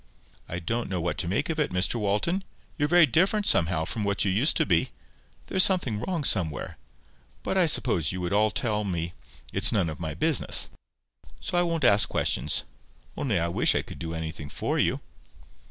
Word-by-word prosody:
"I 85 - -4
don't 115 +7 -3
know 95 -2 -2
what 85 +1 -2
to - - -2
make 95 - 0
of 160 - -4
it, 150 - +1
Mr 90 +1 0
Walton. 105 - 0 0.3
You're 145 -2 0
very 175 +1 +6
different 190 +7 +1
somehow 80 - +2
from 110 +5 -4
what 100 0 0
you 100 - +1
used 120 - +3
to - - +2
be. 85 -4 +1 0.6
There's 185 - +3
something 135 - +2
wrong 170 - -3
somewhere. 85 - 0 0.6
But - - -2
I 185 -3 +4
suppose 90 - +1
you 90 - -5
would 90 +1 -2
all 105 +1 +3
tell 110 -4 -1
me 85 -3 -3 0.4
it's 100 +4 +4
none 95 -8 +1
of 75 - -9
my 80 -3 -4
business. 155 - +1 0.7
So - - -4
I 175 - +4
won't 165 -3 -1
ask 105 -4 +5
questions. - - 0 0.5
Only 110 -10 -1
I 85 - 0
wish 85 - +2
I - - 0
could - - -11
do 80 0 -5
anything 80 -2 -6
for - - -2
you." - - +1
105 Hz, 195 wpm, -26 LUFS, -, 0.7 s, very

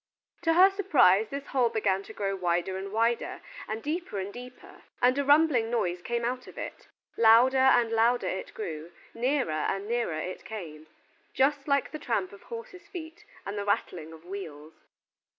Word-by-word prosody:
To 330 -1 +2
her 375 +3 +7
surprise 265 - +4
this 280 0 -5
hole 250 -3 +1
began 200 -4 0
to - - -10
grow 195 -2 -2
wider 175 0 -1
and 195 +1 -5
wider, 230 +2 0 0.3
and 220 +1 -4
deeper 315 - -3
and 195 +1 -4
deeper, 250 +1 -12 0.2
and 250 +1 +4
a - - +2
rumbling 285 -5 +4
noise 180 -7 -1
came 235 +4 -2
out 255 +1 -3
of - - -13
it. - - -7 0.3
Louder 235 +4 +6
and 245 -3 +4
louder 230 +2 +2
it 190 - -4
grew, 165 -5 -6 0.2
nearer 255 - 0
and 195 +6 -2
nearer 235 -9 -1
it 180 +4 -5
came, 160 -8 -8 0.5
just 275 +1 +2
like 280 -1 +1
the 310 - -6
tramp 200 -9 -2
of 200 - -13
horses' 460 -7 -9
feet 340 +3 -9 0.2
and 205 +1 -4
the - - -2
rattling 170 -5 -2
of 160 +1 -14
wheels. 160 -5 -8
230 Hz, 175 wpm, -28 LUFS, 190-275 Hz, 0.5 s, her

